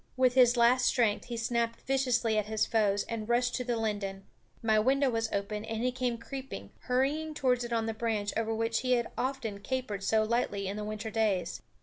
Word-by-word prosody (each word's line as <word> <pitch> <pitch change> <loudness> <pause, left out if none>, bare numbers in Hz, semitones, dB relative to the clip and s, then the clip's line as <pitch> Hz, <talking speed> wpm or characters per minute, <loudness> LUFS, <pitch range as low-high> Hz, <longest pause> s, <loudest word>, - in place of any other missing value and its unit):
With 255 -1 +4
his 250 -1 +5
last 250 +2 +4
strength 225 -5 +2
he 240 -1 -5
snapped 230 0 -1
viciously 250 -4 +1
at 210 -1 0
his 215 0 +1
foes 205 -3 +2
and 225 -1 -4
rushed 245 +1 +2
to 250 - -1
the 240 -1 -1
linden. 205 -3 -3 0.4
My 220 -1 +4
window 265 +4 +3
was 225 -1 -1
open, 205 +1 -2
and 225 +1 -3
he 250 - +2
came 250 -2 -1
creeping, 270 +3 -7
hurrying 290 +5 0
towards 250 -4 +1
it 240 - -6
on 225 -1 +1
the 225 - -2
branch 220 -2 -1
over 225 0 0
which 225 0 0
he 255 -1 +1
had 240 -1 0
often 250 -6 -3
capered 215 -3 -3
so 220 +2 +3
lightly 215 -3 -1
in 195 - -3
the 210 - -4
winter 215 +1 -5
days. 205 -6 0
230 Hz, 210 wpm, -30 LUFS, 215-250 Hz, 0.4 s, his